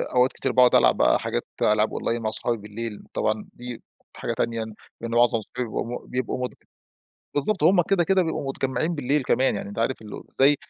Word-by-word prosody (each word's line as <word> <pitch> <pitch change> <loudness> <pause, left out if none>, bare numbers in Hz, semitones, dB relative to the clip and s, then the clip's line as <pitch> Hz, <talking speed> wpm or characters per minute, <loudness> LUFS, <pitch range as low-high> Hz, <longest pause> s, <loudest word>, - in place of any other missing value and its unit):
أوقات 125 +1 +4
كتير - - -2
باقعد 125 -1 +6
ألعب - - +5
بقى - - +4
حاجات - - -2 0.2
ألعاب 105 +1 +3
أونلاين 115 0 -1
مع 110 -1 -1
صحابي 115 +1 -1
بالليل 105 +1 -6
طبعًا 110 0 0
دي 120 -1 -8 0.3
حاجة - - -3
تانية 115 -1 -1 0.4
لأن 115 - -4
معظم 120 0 +4
أصحابي 120 +3 -5
بيبقوا - - -2 0.2
مت - - -18
بيبقوا 125 0 -1
م - - -16 0.9
بالضبط 180 +8 0
همّ 180 -1 +6
كده، 175 0 +2
كده 190 +1 +3
بيبقوا 160 -4 -3
متجمعين 135 +5 -1
بالليل 145 0 +1
كمان 130 -1 +2
يعني 100 - -5
أنت 100 +2 -6
عارف 120 +3 +1 0.4
زي 140 +2 +5
125 Hz, 190 wpm, -25 LUFS, 115-140 Hz, 0.9 s, باقعد